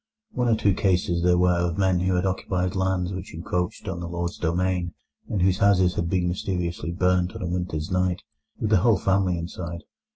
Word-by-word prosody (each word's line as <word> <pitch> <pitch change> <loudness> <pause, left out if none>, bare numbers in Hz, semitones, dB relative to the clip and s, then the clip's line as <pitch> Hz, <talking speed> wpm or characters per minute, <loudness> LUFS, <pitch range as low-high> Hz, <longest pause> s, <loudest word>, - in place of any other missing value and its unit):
One 125 -1 0
or 115 - +4
two 100 -2 +2
cases 90 -2 +1
there 90 0 +4
were 90 -1 +3
of 85 -1 -1
men 95 -2 +2
who 90 +1 +1
had 90 +2 +1
occupied 90 -1 -1
lands 95 -1 0
which 95 -3 -7
encroached 90 +4 -3
on 90 -3 -3
the 85 -1 -5
lord's 85 0 -3
domain, 90 +1 -1 0.3
and 95 -4 0
whose 95 0 +2
houses 95 -3 +4
had 85 - -2
been 90 -1 +1
mysteriously 90 -2 -2
burnt 90 0 +1
on - - -5
a - - -2
winter's 90 -2 -3
night, 90 -1 0 0.4
with 110 - -1
the 105 - +6
whole 110 +3 +4
family 95 -2 +1
inside. 85 -1 -6
90 Hz, 200 wpm, -25 LUFS, 85-95 Hz, 0.4 s, the